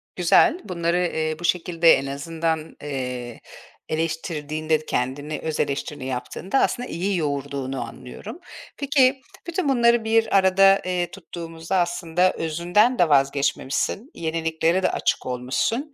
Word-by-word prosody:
Güzel. 180 Hz, -, +4 dB
Bunları, 170 Hz, -2 st, -1 dB
eee, 160 Hz, -3 st, -1 dB
bu 175 Hz, -, -9 dB
şekilde 170 Hz, -1 st, +4 dB
en 135 Hz, -, +1 dB
azından, 160 Hz, +3 st, -3 dB
eee, 125 Hz, -4 st, -5 dB, 0.5 s
eleştirdiğinde, 155 Hz, -1 st, -2 dB
kendini, 145 Hz, +5 st, -2 dB
öz 160 Hz, -1 st, -3 dB
eleştirini 140 Hz, -1 st, -2 dB
yaptığında 130 Hz, -, -2 dB
aslında 245 Hz, 0 st, 0 dB
iyi 185 Hz, +3 st, -1 dB
yoğurduğunu 140 Hz, -3 st, -3 dB
anlıyorum. 125 Hz, -, -9 dB, 0.4 s
Peki, 275 Hz, -2 st, +3 dB, 0.3 s
bütün 345 Hz, -3 st, -1 dB
bunları 235 Hz, -3 st, +4 dB
bir 220 Hz, -2 st, +3 dB
arada, 195 Hz, +1 st, +5 dB
eee, 180 Hz, -1 st, -1 dB
tuttuğumuzda 165 Hz, -1 st, -5 dB
aslında 175 Hz, +1 st, +1 dB
özünden 175 Hz, +9 st, +1 dB
de 175 Hz, -, +4 dB
vazgeçmemişsin, 140 Hz, -, +1 dB
yeniliklere 165 Hz, +2 st, 0 dB
de -, -, +2 dB
açık -, -, -1 dB
olmuşsun, 130 Hz, -, -2 dB
165 Hz, 120 wpm, -23 LUFS, 145-190 Hz, 0.5 s, arada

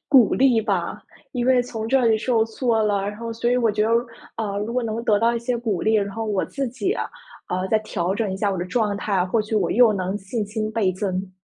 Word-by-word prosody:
鼓 260 Hz, -7 st, +6 dB
励 255 Hz, -3 st, +4 dB
吧。 195 Hz, -6 st, -2 dB, 0.3 s
因 245 Hz, -2 st, -1 dB
为 255 Hz, -1 st, +4 dB
从 225 Hz, -3 st, -5 dB
这 255 Hz, 0 st, +3 dB
里 220 Hz, -, +4 dB
受 225 Hz, 0 st, +1 dB
挫 225 Hz, -1 st, 0 dB
了， 205 Hz, -2 st, +1 dB
然 205 Hz, +1 st, -3 dB
后 230 Hz, 0 st, -5 dB
所 230 Hz, +1 st, -1 dB
以 250 Hz, -, +3 dB
我 230 Hz, -3 st, +3 dB
觉 210 Hz, +1 st, 0 dB
得， 225 Hz, -, 0 dB, 0.5 s
呃， 205 Hz, -3 st, -2 dB
如 220 Hz, +3 st, -3 dB
果 250 Hz, 0 st, 0 dB
能 225 Hz, +1 st, -3 dB
得 210 Hz, -2 st, +3 dB
到 230 Hz, +2 st, +2 dB
一 -, -, 0 dB
些 240 Hz, +1 st, -1 dB
鼓 220 Hz, -6 st, -2 dB
励， 220 Hz, 0 st, +2 dB
然 200 Hz, -1 st, +1 dB
后 225 Hz, +3 st, -4 dB
我 205 Hz, -3 st, 0 dB
自 275 Hz, -1 st, -3 dB
己， 320 Hz, -, -2 dB
呃， 190 Hz, -, -5 dB
再 220 Hz, -, +4 dB
调 185 Hz, -3 st, -2 dB
整 205 Hz, -3 st, -1 dB
一 -, -, -2 dB
下 200 Hz, +1 st, 0 dB
我 190 Hz, -, -2 dB
的 175 Hz, -, -2 dB
状 210 Hz, +1 st, 0 dB
态， 195 Hz, -2 st, 0 dB
或 220 Hz, +5 st, +1 dB
许 220 Hz, +1 st, -4 dB
我 195 Hz, -5 st, +1 dB
又 230 Hz, -1 st, +5 dB
能 190 Hz, 0 st, -2 dB
信 205 Hz, +2 st, -4 dB
心 215 Hz, +1 st, -3 dB
倍 210 Hz, -4 st, +2 dB
增。 185 Hz, 0 st, -3 dB
220 Hz, 275 characters per minute, -23 LUFS, 200-235 Hz, 0.5 s, 鼓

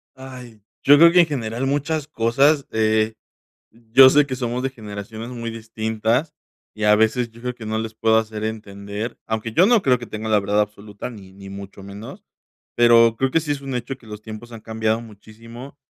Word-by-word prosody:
Ay, 125 Hz, -5 st, -11 dB, 0.2 s
yo 145 Hz, +1 st, +7 dB
creo 170 Hz, +2 st, +7 dB
que 180 Hz, -, +5 dB
en -, -, +3 dB
general, 120 Hz, -3 st, -3 dB
muchas 145 Hz, +1 st, -1 dB
cosas, 140 Hz, +4 st, +2 dB
de 110 Hz, 0 st, +1 dB, 0.6 s
yo 120 Hz, +4 st, +6 dB
sé 145 Hz, 0 st, +4 dB
que 130 Hz, -2 st, -4 dB
somos 125 Hz, 0 st, -3 dB
de 135 Hz, -, -1 dB
generaciones 110 Hz, 0 st, -8 dB
muy 115 Hz, -2 st, -5 dB
distintas, 110 Hz, +4 st, -2 dB, 0.4 s
y 110 Hz, 0 st, -4 dB
a 105 Hz, 0 st, +6 dB
veces 110 Hz, +2 st, +1 dB
yo 115 Hz, +1 st, -16 dB
creo 125 Hz, -1 st, -3 dB
que 110 Hz, -3 st, -10 dB
no 110 Hz, 0 st, -2 dB
les 110 Hz, 0 st, -5 dB
puedo 110 Hz, 0 st, +2 dB
hacer 110 Hz, -1 st, -2 dB
entender, 105 Hz, 0 st, -6 dB
aunque 110 Hz, 0 st, -3 dB
yo 180 Hz, -, +5 dB
no 230 Hz, -3 st, +4 dB
creo 125 Hz, -2 st, +3 dB
que 120 Hz, -, -9 dB
tenga 110 Hz, +1 st, -6 dB
la 105 Hz, -1 st, +4 dB
verdad 100 Hz, +1 st, +1 dB
absoluta 105 Hz, +2 st, -5 dB
ni 95 Hz, -5 st, -13 dB
ni 95 Hz, 0 st, -12 dB
mucho 100 Hz, 0 st, -10 dB
menos, 100 Hz, +3 st, -10 dB, 0.5 s
pero 115 Hz, -1 st, +5 dB
creo 135 Hz, +1 st, 0 dB
que 165 Hz, -, +2 dB
sí 150 Hz, -, -6 dB
es 145 Hz, -1 st, -1 dB
un 135 Hz, -2 st, -6 dB
hecho 125 Hz, +2 st, -4 dB
que 115 Hz, -, -19 dB
los 105 Hz, 0 st, -9 dB
tiempos 110 Hz, +2 st, -10 dB
han 115 Hz, -, -9 dB
cambiado 110 Hz, 0 st, -1 dB
muchísimo, 115 Hz, +5 st, -13 dB
115 Hz, 205 wpm, -21 LUFS, 110-130 Hz, 0.6 s, yo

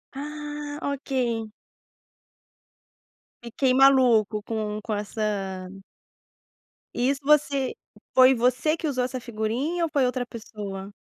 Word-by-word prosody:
Ah, 295 Hz, 0 st, -6 dB
ok. 255 Hz, -5 st, -2 dB, 1.9 s
Fiquei 255 Hz, +2 st, +1 dB
maluco 245 Hz, -6 st, +5 dB
com 215 Hz, -1 st, -3 dB
com 220 Hz, 0 st, -4 dB
essa 200 Hz, -3 st, -3 dB, 1.3 s
Isso 270 Hz, +3 st, +1 dB
você 280 Hz, -2 st, +2 dB, 0.4 s
foi 260 Hz, 0 st, +7 dB
você 255 Hz, +7 st, +1 dB
que 315 Hz, -, -3 dB
usou 255 Hz, -3 st, 0 dB
essa 255 Hz, +1 st, -3 dB
figurinha 240 Hz, +9 st, -2 dB
ou 330 Hz, -, 0 dB
foi 280 Hz, -4 st, +2 dB
outra 250 Hz, 0 st, -1 dB
pessoa? 205 Hz, -4 st, -7 dB
250 Hz, 105 wpm, -25 LUFS, 215-280 Hz, 1.9 s, foi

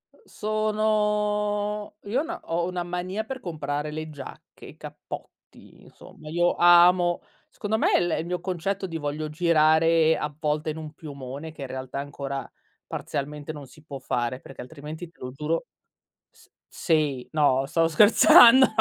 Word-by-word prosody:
Uhm, -, -, -29 dB
sono 210 Hz, -1 st, -1 dB
io 230 Hz, +7 st, -1 dB
ho -, -, -3 dB
'na 340 Hz, +1 st, -6 dB
ho 170 Hz, +1 st, -1 dB
una 180 Hz, -1 st, -3 dB
mania 180 Hz, +4 st, -4 dB
per 260 Hz, +4 st, -7 dB
comprare 150 Hz, -, -4 dB
le 155 Hz, +1 st, -5 dB
giacche, 145 Hz, -3 st, -11 dB
i -, -, -13 dB
cappotti, -, -, -11 dB
insomma. 155 Hz, -, -14 dB
Io 175 Hz, +2 st, +1 dB
amo, 175 Hz, 0 st, +5 dB, 0.3 s
secondo 215 Hz, +1 st, -2 dB
me -, -, +3 dB
l 175 Hz, -, 0 dB
il 160 Hz, -, -4 dB
mio 180 Hz, +1 st, -3 dB
concetto 190 Hz, +2 st, -3 dB
di 165 Hz, -2 st, -5 dB
voglio 150 Hz, 0 st, -4 dB
girare 160 Hz, 0 st, +3 dB
a 150 Hz, 0 st, -4 dB
volte 155 Hz, 0 st, -1 dB
in 155 Hz, -, -8 dB
un 155 Hz, -1 st, -8 dB
piumone 145 Hz, 0 st, -8 dB
che 155 Hz, -, -13 dB
in 135 Hz, -, -4 dB
realtà 130 Hz, +1 st, -6 dB
ancora 140 Hz, -1 st, -5 dB, 0.4 s
parzialmente 145 Hz, +2 st, -5 dB
non 145 Hz, -2 st, -9 dB
si 150 Hz, +3 st, -18 dB
può 140 Hz, -3 st, -8 dB
fare, 125 Hz, -1 st, -2 dB
perché 135 Hz, -, -11 dB
altrimenti 155 Hz, +5 st, -9 dB
te -, -, -33 dB
lo 125 Hz, -, -6 dB
giuro 155 Hz, -, -2 dB, 0.7 s
s -, -, -23 dB, 0.2 s
sì, 150 Hz, -6 st, 0 dB
no, 145 Hz, -4 st, +3 dB
stavo 165 Hz, +3 st, +1 dB
scherzando, 230 Hz, +8 st, +8 dB
160 Hz, 160 wpm, -25 LUFS, 150-185 Hz, 0.7 s, scherzando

